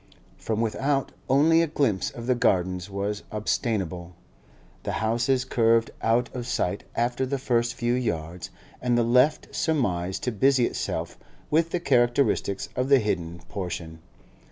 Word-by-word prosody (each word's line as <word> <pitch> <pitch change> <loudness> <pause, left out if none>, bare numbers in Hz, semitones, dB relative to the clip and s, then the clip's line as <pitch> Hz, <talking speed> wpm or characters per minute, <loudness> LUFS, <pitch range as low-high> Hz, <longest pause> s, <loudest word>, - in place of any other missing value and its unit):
From 110 0 -2
without, 135 +4 0 0.2
only 155 +5 +5
a 165 - +1
glimpse 135 -10 0
of 120 - -8
the 125 - +3
Gardens 95 -5 +1
was 100 +1 -3
obtainable; 95 -5 -2 0.7
the - - -3
houses 120 +6 +1
curved 115 -1 +2
out 120 +2 +2
of 120 -1 -4
sight 100 -5 -1
after 120 +2 0
the 135 +1 -1
first 120 -2 0
few 120 0 0
yards, 85 -8 -3 0.3
and 125 -1 +1 0.2
left 130 +5 +3
surmise 95 - 0
to 125 - -1
busy 130 +3 +3
itself - - -3 0.3
with 160 +2 +3
the 175 - -1
characteristics 120 - +1
of 130 +1 -1
the 140 - +7
hidden 85 -7 -2
portion. 85 -4 -5
120 Hz, 140 wpm, -26 LUFS, 95-130 Hz, 0.7 s, the